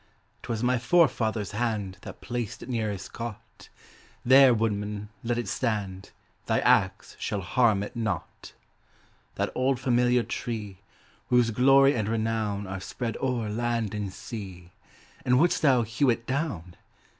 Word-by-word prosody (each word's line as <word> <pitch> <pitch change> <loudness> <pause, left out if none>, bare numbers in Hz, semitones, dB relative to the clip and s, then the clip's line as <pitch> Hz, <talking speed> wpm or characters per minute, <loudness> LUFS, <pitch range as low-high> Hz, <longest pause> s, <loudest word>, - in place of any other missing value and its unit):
'Twas 115 -1 -3
my 125 0 +2
forefather's 120 - +2
hand 105 -4 -2
That - - -10
placed 120 -3 -4
it - - -10
near 115 -3 -1
his 95 -1 -6
cot; 115 -3 -9 0.6
There, 130 +1 +8
woodman, 105 -2 -1
let 120 0 -1
it 120 -3 -3
stand, 100 -4 -2 0.4
Thy - - +2
axe - - +2
shall 100 - -2
harm 105 +1 +2
it 105 - -8
not. 110 -7 -4 0.8
That - - -1
old 130 0 +1
familiar 125 -1 +2
tree, 105 -7 -5 0.5
Whose 125 -2 +3
glory 135 +4 +5
and 110 -3 -1
renown 110 -2 -1
Are 95 0 -6
spread 115 +2 -4
o'er 125 -4 -1
land 115 -1 -1
and 105 -2 -3
sea 95 -3 -8 0.5
And 125 0 +3
wouldst 175 +3 +2
thou 130 -5 +4
hew 120 +5 +1
it 115 -1 0
down? 130 - -3
115 Hz, 145 wpm, -27 LUFS, 105-125 Hz, 0.8 s, There